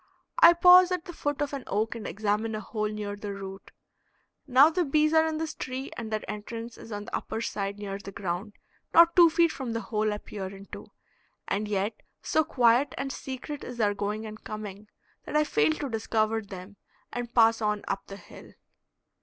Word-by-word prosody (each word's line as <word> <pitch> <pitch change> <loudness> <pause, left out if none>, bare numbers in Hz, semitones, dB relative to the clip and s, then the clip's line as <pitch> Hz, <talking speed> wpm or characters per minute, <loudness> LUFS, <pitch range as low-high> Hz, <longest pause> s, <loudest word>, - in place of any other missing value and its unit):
I 420 -9 +9
pause 360 +1 +7
at 360 -1 -2
the 350 - -8
foot 290 -2 -2
of 290 - -5
an 275 -2 -4
oak 215 +3 0
and 230 -3 -6
examine 215 +1 -1
a - - -3
hole 215 0 -3
near 210 -1 -4
the 205 -1 -6
root; 195 0 -8 0.8
now 270 +5 +6
the 360 +2 +1
bees 305 +1 +2
are 320 0 +5
in 315 -1 -2
this 320 0 -3
tree 260 +1 -5
and 230 -2 -5
their 215 0 -3
entrance 230 +2 -6
is 225 - -12
on 205 0 -5
the - - -4
upper 220 - -4
side 200 -3 -3
near 200 -1 -5
the 200 -1 -9
ground, 195 +2 -4 0.4
not 335 0 +7
two 345 -2 +8
feet 335 0 +3
from 255 -4 -5
the 230 - -1
hole 215 -2 -1
I 210 - -2
peer 200 -2 -7
into, 195 +1 -10 0.6
and 210 +2 -1
yet 205 +1 -2 0.2
so 315 - +2
quiet 255 -2 +3
and 270 0 -3
secret 270 +2 -6
is 245 - -7
their 210 -3 +2
going 210 +2 -3
and 215 0 -9
coming 210 -1 -7 0.4
that - - -6
I 300 - +5
fail 410 +2 +2
to 295 -2 -4
discover 225 -1 0
them 195 -1 -10 0.4
and 245 -1 -4
pass 225 -1 +5
on 210 -1 0
up 195 0 -3
the 195 - -8
hill. - - -14
225 Hz, 205 wpm, -28 LUFS, 205-290 Hz, 0.8 s, I